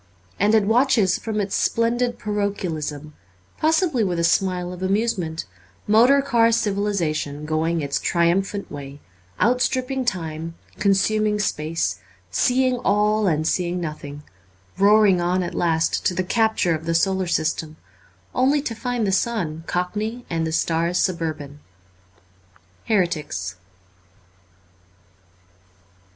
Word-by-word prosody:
And 210 +3 +4
it 215 - +4
watches 225 -4 +3
from 220 -2 -3
its 200 -1 -2
splendid 240 +1 +1
parochialism, 175 -8 -3 0.5
possibly 315 - +2
with 180 -4 -1
a 170 - 0
smile 180 +1 +1
of 180 - -10
amusement, 190 -4 -1 0.4
motor 245 +6 +5
car 235 -4 +3
civilization 190 -9 -1
going 160 +2 0
its 140 -1 -1
triumphant 190 +4 0
way, 140 -1 -8 0.4
outstripping 255 +2 +1
time, 165 -5 -3 0.2
consuming 210 +2 +2
space, 155 - -1 0.3
seeing 255 - +2
all 210 -1 +2
and 155 -2 +1
seeing 180 0 0
nothing, 150 -3 -6 0.6
roaring 200 -2 +5
on 180 +1 +1
at 175 - -5
last 165 -1 0
to 180 - -1
the 185 - 0
capture 220 -3 +1
of 160 0 -4
the 165 0 0
solar 190 +1 +1
system, 155 -1 -1 0.6
only 270 +4 +3
to 275 -5 -3
find 245 -1 -2
the 195 - +1
sun 190 -6 -1
cockney 215 +7 -3
and 165 -1 0
the - - -3
stars 165 +2 0
suburban. 155 -6 -2 0.6
' 90 -1 -33
Heretics.' 155 - -1
185 Hz, 120 wpm, -22 LUFS, 160-220 Hz, 0.6 s, motor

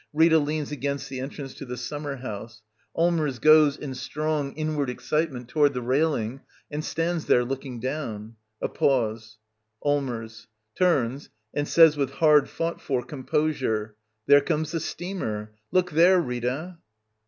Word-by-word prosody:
Rita 160 +1 +5
leans 150 0 -2
against 140 0 -3
the 130 - -5
en 135 +2 -4
trance 140 -3 -8
to - - -9
the 125 -2 -6
summer 145 +3 -4
house. 115 -2 -8 0.3
Allmers 165 -6 +1
goes, 155 +1 +6
in 140 -3 -6
strong, 145 +2 -2
inward 155 -3 -1
excitement, 135 -1 -2
toward 145 +1 +2
the 125 - -2
railing, 130 -2 0 0.3
and 150 +1 -3
stands 165 0 -1
there 125 - +4
looking 135 -1 -5
down. 115 -5 -4 0.3
A - - +2
pause.] 110 -4 0 0.5
Allmers. 120 -6 -2 0.3
[Turns, 140 -6 +1 0.2
and 145 0 -1
says 160 -3 +6
with 140 -1 -1
hard 150 -2 +4
fought 165 +1 -3
for 130 -3 -1
composure] 130 -7 -1 0.3
There 145 0 +7
comes 150 +1 -1
the 165 - -1
steamer. 110 - -4 0.2
Look 180 -1 +2
there, 175 +4 +6
Rita. 135 +5 -3
140 Hz, 145 wpm, -26 LUFS, 125-155 Hz, 0.5 s, There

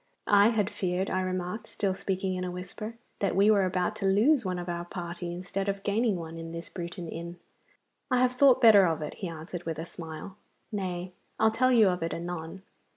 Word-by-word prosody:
'I 205 0 +6
had 215 -3 +1
feared,' 190 -2 -1
I 185 - +1
remarked, 185 +3 -3
still 195 -2 -1
speaking 190 0 -2
in 185 0 -3
a 180 - -2
whisper, 185 +5 -6 0.2
'that 200 - 0
we 200 +3 +5
were 200 -3 +4
about 180 -1 0
to 195 - 0
lose 235 +9 +4
one 185 -2 -2
of 175 0 -5
our 170 0 -3
party 175 0 -5
instead 190 +3 -3
of 195 0 -3
gaining 215 +1 +1
one 165 -1 -6
in 165 0 -7
this 170 0 -6
Bruton 175 0 -6
inn.' 170 +2 -6 0.7
'I 255 - +3
have 255 -1 +4
thought 260 0 +5
better 205 -5 +8
of 160 -2 -1
it,' 150 - -5
he 190 - -2
answered, 165 +1 -7
with 165 -2 -2
a 160 - -4
smile. 165 +3 -8 0.3
'Nay, 185 -3 -3 0.3
I'll 220 - +5
tell 255 +3 +3
you 225 -5 +6
of 180 -1 -2
it 165 - -2
anon. 170 +1 -6
185 Hz, 215 wpm, -29 LUFS, 175-205 Hz, 0.7 s, better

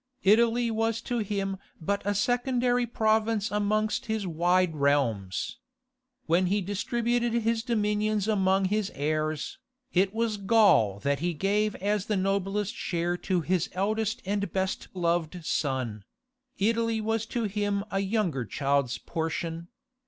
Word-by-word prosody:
Italy 230 +3 +4
was 225 0 0
to 240 0 -2
him 195 -2 -2 0.2
but 200 +5 -1
a 205 0 0
secondary 245 +2 +1
province 220 -2 +1
amongst 210 +1 0
his 220 -2 -1
wide 175 0 +2
realms. 135 -10 0 0.7
When 175 +3 +3
he 200 +3 +2
distributed 235 +5 -1
his 230 -1 +1
dominions 210 -3 0
among 195 -2 +2
his 205 +1 0
heirs, 155 +1 -2 0.3
it 190 +1 +3
was 225 -1 -1
Gaul 195 - +4
that 140 0 0
he 175 +1 -1
gave 205 +5 +1
as 205 0 -1
the 210 - +1
noblest 195 +2 0
share 175 0 -1
to 180 -1 0
his 180 +1 0
eldest 215 +3 -1
and 200 +1 -1
best 190 0 -2
loved 170 -1 -1
son: 130 -10 -1 0.5
Italy 230 +2 +1
was 225 +1 -1
to 235 0 -2
him 205 -1 -1
a 195 - 0
younger 195 - 0
child's 135 +1 0
portion. 165 +3 -4
200 Hz, 135 wpm, -28 LUFS, 170-220 Hz, 0.7 s, Italy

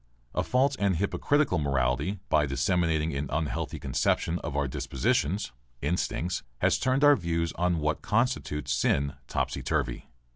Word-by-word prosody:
A - - +1
false 135 +2 +2
and 100 -2 +2
hypocritical 100 - +1
morality, 70 +6 0
by 75 -3 +3
disseminating 80 +3 +1
an 70 0 -3
unhealthy 80 0 -2
conception 85 +2 0
of 70 -3 -4
our 70 -1 +1
dispositions 70 - -1 0.3
(instincts), 90 +2 -1 0.2
has - - +2
turned 130 +2 +1
our 145 0 +8
views 85 - -1
on 90 0 +1
what 75 -1 -1
constitutes 105 - 0
sin 70 +2 +1
topsy - - -2
turvy. - - -2
80 Hz, 140 wpm, -28 LUFS, 70-100 Hz, 0.3 s, our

